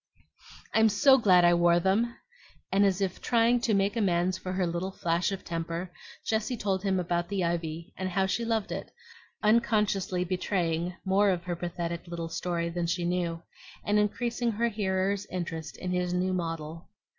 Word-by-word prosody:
"I'm 220 0 +5
SO 265 +6 +5
glad 185 -6 +5
I 175 - +6
wore 170 0 +4
them!" 210 +7 +1 0.6
and 200 +1 +4
as 195 0 0
if 190 -2 -2
trying 235 0 +3
to 225 -3 +2
make 200 +3 +1
amends 185 -4 +1
for 185 0 -5
her 185 -1 +1
little 175 +2 -2
flash 170 0 0
of 195 - -5
temper, 170 +1 -4 0.3
Jessie 225 +3 -1
told 195 -3 -1
him 190 -2 +1
about 175 0 -1
the 195 -3 -1
ivy, 170 -1 -3
and 185 0 -3
how 190 +1 +1
she 200 +5 -1
loved 225 -3 -1
it, - - -5 0.5
unconsciously 210 -4 +2
betraying 180 -2 -1
more 200 +2 +3
of 180 -2 0
her 175 -1 -3
pathetic 170 0 -4
little 170 -1 -5
story 170 0 -2
than 170 0 -2
she 175 0 -1
knew, 170 -1 -1 0.4
and 205 0 +2
increasing 235 +2 0
her 235 +3 +1
hearer's 200 -1 -1
interest 170 -3 -5
in 180 - -4
his 180 0 0
new 185 +1 0
model. 165 -2 -4
185 Hz, 175 wpm, -28 LUFS, 170-205 Hz, 0.6 s, I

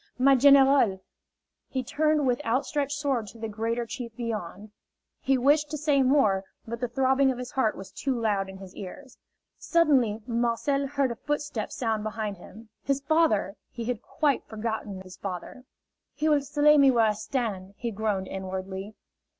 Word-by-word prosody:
"My 270 +2 +5
general!" 270 -7 +5 0.7
He 260 -1 -2
turned 300 +3 +1
with 255 +3 0
outstretched 280 +3 -1
sword 270 -7 -1
to 230 - -12
the 225 0 -4
greater 230 +2 -2
chief 230 0 -7
beyond. 215 -3 -5 0.5
He 270 0 +2
wished 290 +4 +3
to 305 - -3
say 290 -2 +2
more, 255 -8 +3 0.2
but 235 +1 -5
the 245 - -1
throbbing 265 +2 +2
of 255 - -5
his 250 0 -6
heart 225 -5 0
was 190 0 -9
too 255 +5 -2
loud 205 -4 0
in 190 - -9
his 190 -1 -12
ears. 245 +7 -10 0.4
Suddenly 260 -11 +2
Marcel 240 +4 0
heard 275 -2 0
a - - -4
footstep 295 -4 -3
sound 220 -3 -1
behind 215 -2 -4
him. 215 +5 -14
His 275 -1 0
father! 280 - +2
He 235 -2 -6
had 245 -2 -2
quite 290 -1 0
forgotten 220 -3 -4
his 185 -1 -12
father. 195 +7 -7 0.5
"He 305 - 0
will 295 -2 +4
slay 290 +1 +4
me 275 -1 +7
where 235 -3 +4
I 215 - +2
stand!" 210 -4 -4
he 235 -1 -3
groaned 200 -3 -2
inwardly. 190 +2 -5
235 Hz, 170 wpm, -27 LUFS, 210-275 Hz, 0.7 s, me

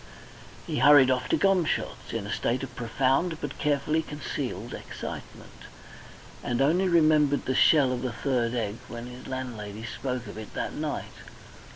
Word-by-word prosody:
He - - -2
hurried 135 -1 +7
off 125 -1 -1
to - - +3
Gomshott's 190 -5 0
in 115 -3 -3
a 105 - -3
state 125 +3 -1
of 125 -2 -7
profound 135 +8 0
but 145 -1 -6
carefully 150 +2 +1
concealed 150 -2 -5
excitement, - - -8 0.9
and 120 0 -1
only 170 +8 +3
remembered 155 -4 +4
the 130 - 0
shell 140 0 +5
of 125 -1 -2
the 130 -1 -2
third 120 -1 -1
egg 110 -2 -2
when 120 0 -7
his 125 +1 -10
landlady 115 -5 -5
spoke 125 0 -4
of 105 +1 -8
it 110 - -10
that - - -3
night. - - -4
130 Hz, 160 wpm, -27 LUFS, 120-150 Hz, 0.9 s, hurried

